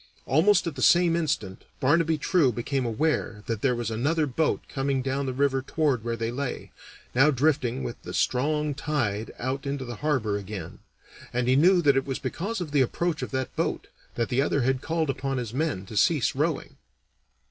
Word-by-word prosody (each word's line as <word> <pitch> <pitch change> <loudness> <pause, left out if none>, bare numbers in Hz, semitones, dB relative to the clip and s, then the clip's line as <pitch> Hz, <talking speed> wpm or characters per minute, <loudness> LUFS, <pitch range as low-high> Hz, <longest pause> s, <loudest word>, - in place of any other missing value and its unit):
Almost 175 +9 +4
at 165 -4 -3
the - - -5
same 175 -1 +5
instant 110 - -2 0.2
Barnaby 160 +3 +3
True 150 -3 +3
became 125 +2 -2
aware 115 -3 -1
that 115 -2 -3
there 130 -3 +2
was 120 -1 -3
another 150 +8 +1
boat 150 +3 0
coming 135 -1 -1
down 135 +1 -1
the - - 0
river 135 0 +1
toward 140 -4 0
where 115 0 -2
they 115 0 -2
lay, 135 +1 -4 0.4
now 135 +5 +5
drifting 135 -3 +1
with 120 - -6
the - - -8
strong 150 +3 0
tide 120 -8 -2
out 135 +3 -3
into 140 -1 -3
the 120 -2 -6
harbor 125 -9 0
again, 100 -4 -7 0.5
and 125 0 -1
he 130 - +4
knew 175 +5 +5
that 140 -2 +5
it 135 0 0
was 135 - -2
because 205 +6 -3
of 170 -5 -5
the 145 -2 +3
approach 165 +6 0
of - - -3
that 130 -1 -3
boat - - -2 0.3
that 115 - -1
the 130 +1 +2
other 140 -1 +1
had 130 0 +1
called 160 -3 0
upon 135 0 -3
his 120 -3 -4
men 135 -10 -1
to 105 - -9
cease 145 - +3
rowing. 150 +2 -2
135 Hz, 195 wpm, -26 LUFS, 120-155 Hz, 0.5 s, same